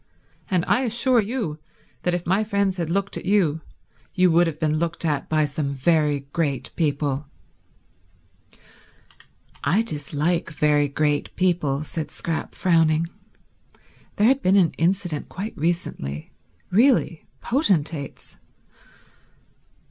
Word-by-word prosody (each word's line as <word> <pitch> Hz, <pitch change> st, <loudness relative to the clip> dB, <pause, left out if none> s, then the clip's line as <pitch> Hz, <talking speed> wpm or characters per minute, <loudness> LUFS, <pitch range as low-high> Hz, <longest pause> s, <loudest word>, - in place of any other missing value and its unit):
And 180 Hz, -4 st, +1 dB
I 255 Hz, -, +2 dB
assure 240 Hz, 0 st, +3 dB
you 210 Hz, -8 st, -3 dB, 0.4 s
that 180 Hz, 0 st, 0 dB
if 175 Hz, -, -4 dB
my 190 Hz, +5 st, +2 dB
friends 200 Hz, -3 st, 0 dB
had 170 Hz, -3 st, -2 dB
looked 195 Hz, +3 st, -1 dB
at -, -, -7 dB
you, 180 Hz, -6 st, +2 dB, 0.5 s
you 180 Hz, -1 st, +4 dB
would 170 Hz, +1 st, +4 dB
have 155 Hz, -2 st, -4 dB
been 155 Hz, -1 st, +1 dB
looked 170 Hz, +1 st, -2 dB
at 145 Hz, -3 st, -1 dB
by 155 Hz, -1 st, +2 dB
some 145 Hz, -1 st, -3 dB
very 150 Hz, 0 st, +2 dB
great 145 Hz, -6 st, -1 dB
people." 145 Hz, -3 st, -1 dB, 2.4 s
"I 170 Hz, +11 st, +2 dB
dislike 155 Hz, -1 st, -1 dB
very 150 Hz, -2 st, +2 dB
great 145 Hz, +1 st, -1 dB
people," 155 Hz, -6 st, +1 dB
said 155 Hz, 0 st, -4 dB
Scrap, 165 Hz, -1 st, -4 dB
frowning. 165 Hz, -2 st, +2 dB, 1.1 s
There 210 Hz, -, +2 dB
had 270 Hz, +3 st, +4 dB
been 185 Hz, +2 st, +3 dB
an 185 Hz, -5 st, +4 dB
incident 175 Hz, -2 st, 0 dB
quite 205 Hz, +4 st, -6 dB
recently—really 170 Hz, -, -1 dB
potentates. 165 Hz, -, -1 dB
165 Hz, 120 wpm, -23 LUFS, 150-190 Hz, 2.4 s, you